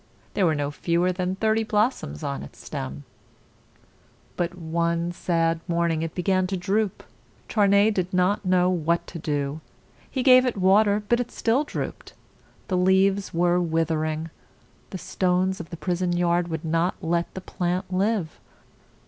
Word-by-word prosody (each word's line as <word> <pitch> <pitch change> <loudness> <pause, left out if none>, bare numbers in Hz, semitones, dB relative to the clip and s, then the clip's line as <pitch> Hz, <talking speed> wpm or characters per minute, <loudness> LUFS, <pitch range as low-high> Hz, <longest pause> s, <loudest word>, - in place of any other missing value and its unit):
There 195 -4 +2
were 160 - +2
no 145 0 -2
fewer 170 +4 +1
than 180 0 -2
thirty 220 +2 +1
blossoms 210 - -1
on 70 -1 -3
its 70 - -11
stem. 70 +2 -6 1.3
But 175 +1 -2
one 170 +1 -1
sad 165 -2 0
morning 170 -2 0
it 165 -1 -4
began 185 +1 +1
to 190 0 -2
droop. 200 +2 -1 0.4
Charney 200 0 +4
did 185 -3 -2
not 185 +3 +1
know 180 -1 +3
what 170 -2 0
to 170 - -8
do. 145 0 -2 0.5
He 260 - -2
gave 255 -1 +7
it 250 -4 -1
water, 200 +2 +4
but 240 +1 +1
still 235 +4 +1
it 300 - -6
drooped. - - -6 0.5
The 185 - 0
leaves 190 +2 +3
were 175 +1 +2
with 165 -1 0
er 155 -1 0
ing. 155 +1 -3 0.6
The 190 - -5
stones 185 +1 0
of 170 - -8
the 170 - -7
prison 175 0 -1
yard 175 0 +2
would 160 -1 -4
not 165 +3 +1
let 170 +1 0
the 190 - -5
plant 180 +1 -3
live. 195 -3 0
180 Hz, 160 wpm, -25 LUFS, 165-195 Hz, 1.3 s, gave